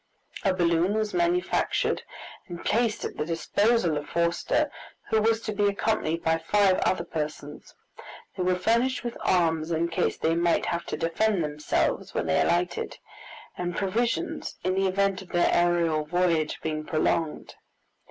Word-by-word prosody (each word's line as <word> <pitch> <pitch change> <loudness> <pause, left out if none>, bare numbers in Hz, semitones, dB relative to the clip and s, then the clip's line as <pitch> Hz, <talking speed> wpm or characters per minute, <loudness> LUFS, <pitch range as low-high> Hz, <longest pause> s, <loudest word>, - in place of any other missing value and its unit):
A 195 - +3
balloon 175 +2 +2
was 215 -1 -1
manufactured 350 +1 +1 0.5
and 175 -2 -8
placed 230 0 +1
at - - -6
the - - 0
disposal 170 +2 +1
of 145 - -6
Forster, 170 0 0 0.4
who 220 - +3
was 225 +1 +2
to 215 - -3
be 205 0 +2
accompanied 200 -5 0
by 165 0 +2
five 190 +3 +3
other 185 -2 +1
persons. 150 -3 -6 0.6
They - - -4
were 180 0 +2
furnished 235 +6 +1
with 240 -1 -4
arms 165 -3 +2
in 170 0 0
case 165 - 0
they 160 - +1
might 170 0 +2
have 170 0 -2
to - - -3
defend 185 +3 +1
themselves 150 0 -1
when - - 0
they 80 0 +2
alighted, 175 +1 0 0.6
and 175 -1 -3
provisions 210 -1 -1
in 185 - +1
the 195 0 +1
event 195 0 +1
of 190 - -13
their 175 -1 +2
aerial 170 -3 +2
voyage 165 -1 +1
being 155 -1 -2
prolonged. 155 0 -1
175 Hz, 155 wpm, -26 LUFS, 165-205 Hz, 0.6 s, A